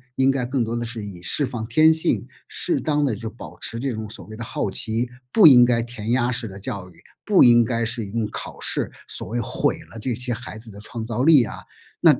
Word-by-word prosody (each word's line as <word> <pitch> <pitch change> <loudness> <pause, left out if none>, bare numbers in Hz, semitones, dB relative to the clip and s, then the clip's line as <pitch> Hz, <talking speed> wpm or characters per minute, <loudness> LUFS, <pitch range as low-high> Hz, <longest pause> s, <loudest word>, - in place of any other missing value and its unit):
应 135 0 +3
该 130 -2 -2
更 130 0 -1
多 115 +1 -3
的 120 0 -3
是 115 -2 -5
以 90 -4 -9
释 145 +10 +3
放 120 -4 -5
天 155 +7 +5
性， 160 - +1 0.2
适 325 -5 -1
当 150 -2 0
地 120 -6 0
就 110 +2 -6
保 115 - -12
持 115 - -5
这 135 -1 -2
种 110 -1 -6
所 - - -9
谓 110 0 -10
的 115 - -6
好 100 -2 -3
奇， 115 +4 +2 0.2
不 210 -6 +6
应 125 -4 +8
该 120 -1 +2
填 115 -1 -5
鸭 125 0 +2
式 120 -1 -3
的 95 -1 -10
教 100 -4 -6
育， 85 - -21 0.2
不 205 -3 +5
应 120 -1 +6
该 115 0 -1
是 115 -1 -2
用 110 +2 -2
考 - - -6
试 - - +1 0.2
所 - - -4
谓 120 +2 -3
毁 - - -1
了 115 - -9
这 120 +1 -2
些 125 0 +1
孩 115 -2 -8
子 110 0 -7
的 100 - -12
创 110 +1 -7
造 120 +2 -2
力 150 -5 +6
啊。 110 - -6 0.4
那 - - +5
120 Hz, 265 characters per minute, -22 LUFS, 110-125 Hz, 0.4 s, 应